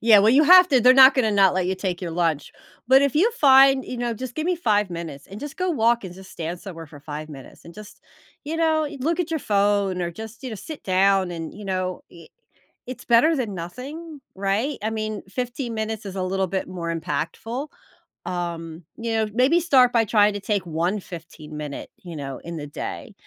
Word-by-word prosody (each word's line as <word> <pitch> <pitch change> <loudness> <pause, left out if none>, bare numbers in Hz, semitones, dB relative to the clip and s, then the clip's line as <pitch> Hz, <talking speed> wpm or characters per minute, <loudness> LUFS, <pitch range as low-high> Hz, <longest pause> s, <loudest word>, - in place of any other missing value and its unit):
yeah 225 -2 +6
well, 210 +2 +5
you 280 +5 +5
have 365 +3 +8
to, 260 -4 +4
they're 250 +2 +6
not 265 0 +8
gonna 245 -5 +2
not 195 -3 +4
let 185 -1 0
you 190 - 0
take 185 -2 -4
your 175 -3 -4
lunch. 165 -3 -1 0.4
But 265 +1 +6
if 280 -3 +1
you 370 +10 +3
find, 270 - +5
you 255 - -6
know, 240 -1 -2
just 250 +1 -7
give 310 +1 -3
me 360 0 +1
5 210 - +1
minutes, 165 -5 -7
and 195 - -10
just 290 -1 -7
go 370 0 -1
walk 235 - +2
and 180 -2 -8
just 190 0 -13
stand 170 +1 -5
somewhere 165 -5 -9
for 145 -1 -14
5 150 +1 -7
minutes 135 -4 -13
and 170 - -13
just, 210 -1 -13 0.4
you 315 +3 -4
know, 320 -1 +2
eh, 295 0 -6
look 330 +6 0
at 345 -1 -3
your 320 - -1
phone, 200 -2 +1
or 170 -1 -2
just, 220 +6 -10
you 260 - -5
know, - - -5
sit 310 +8 -9
down, 190 0 +2
and 165 -2 -6
you 210 - -10
know, 185 -1 -3
e 170 - -15 0.6
it's 255 +1 -8
better 245 +8 +4
than 245 -8 -2
nothing, 275 - -8 0.2
right? 200 +9 -1
I 220 - -1
mean, 215 -1 -4
15 245 +2 -4
minutes 220 -1 -4
is 190 - -7
a 190 - -2
little 190 +1 -1
bit 190 +1 -3
more 170 -2 -4
impactful, 195 - -4 0.6
um, 170 -2 -5
you 230 0 -3
know, 220 -1 +1
maybe 260 +9 +3
start 265 -8 +4
by 230 -2 +3
trying 210 -1 +3
to 205 - -4
take 200 -2 -2
one 170 +5 -1
fifteen-minute, 155 -5 -9
you 175 -2 -8
know, 135 -3 -6
in 170 0 -8
the 145 -1 -6
day, 145 - -7
205 Hz, 220 wpm, -23 LUFS, 175-255 Hz, 0.6 s, have